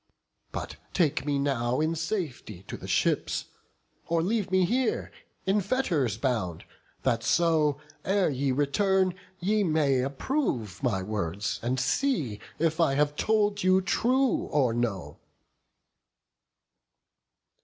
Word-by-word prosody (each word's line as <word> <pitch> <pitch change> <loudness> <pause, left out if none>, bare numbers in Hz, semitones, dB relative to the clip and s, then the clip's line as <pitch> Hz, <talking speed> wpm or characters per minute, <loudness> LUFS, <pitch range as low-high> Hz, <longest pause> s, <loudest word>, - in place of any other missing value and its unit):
But - - -5 0.2
take 150 -5 +1
me 145 -1 +1
now 130 -3 0
in 155 +2 +1
safety 160 - -4
to - - -7
the - - -9
ships; - - +1 0.6
Or 165 -1 +1
leave 205 +1 0
me 185 -1 +3
here 245 +5 0 0.3
in 200 +2 +2
fetters 175 - 0
bound, 110 - -2 0.4
that 120 -3 +1
so, 155 -3 +2 0.2
Ere 195 -4 +2
ye 135 0 0
return, 185 +7 +2 0.3
ye 210 +4 +2
may 155 -6 +2
approve 135 - -2
my 105 -8 0
words, 100 -1 -2
And 125 +3 -1
see 135 - 0 0.2
if 160 0 0
I 160 -5 +3
have 145 +1 +2
told 210 +1 +1
you 185 +1 +4
true, 250 +7 +1
or 130 -6 +2
no." 115 -6 -2
150 Hz, 120 wpm, -28 LUFS, 125-190 Hz, 0.6 s, you